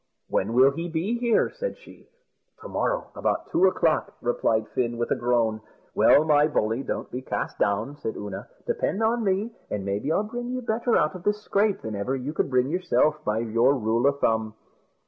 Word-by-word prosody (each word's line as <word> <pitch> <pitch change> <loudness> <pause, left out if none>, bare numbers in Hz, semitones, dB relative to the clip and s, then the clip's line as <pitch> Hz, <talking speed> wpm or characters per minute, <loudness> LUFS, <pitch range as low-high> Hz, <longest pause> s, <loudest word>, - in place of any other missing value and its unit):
"When 105 +4 0
will 130 +3 +6
he 165 +4 -5
be 185 +9 -1
here?" 235 -2 +2
said - - -5
she. - - -17 0.5
"To - - -8
morrow, - - -2
about - - -2
two 190 - +4
o'clock," 165 -4 +1
replied 110 -2 0
Fin, 120 -2 -1
with 120 - -2
a - - +4
groan. 115 -3 +1 0.3
"Well, 150 - +5
my 150 -1 +4
bully, 115 -4 0
don't - - -4
be 125 - -4
cast - - -4
down," 105 +8 0
said 110 - -4
Oonagh; 100 -2 -6 0.2
"depend 220 - -1
on 230 +1 +1
me, 200 +3 0 0.2
and 100 -2 -3
maybe 100 +9 -1
I'll 200 - +2
bring 240 +3 -5
you 255 0 -3
better 230 +1 +1
out 150 - +1
of 185 - -8
this 210 +3 -1
scrape 205 0 +1
than 110 -1 -5
ever 100 +7 -2
you 135 +3 -4
could 150 - 0
bring 130 0 +2
yourself, 155 -4 +1
by 105 -4 0
your 115 +4 +3
rule 115 +1 +1
o' 140 - +4
thumb." 110 -5 0
140 Hz, 200 wpm, -25 LUFS, -, 0.5 s, will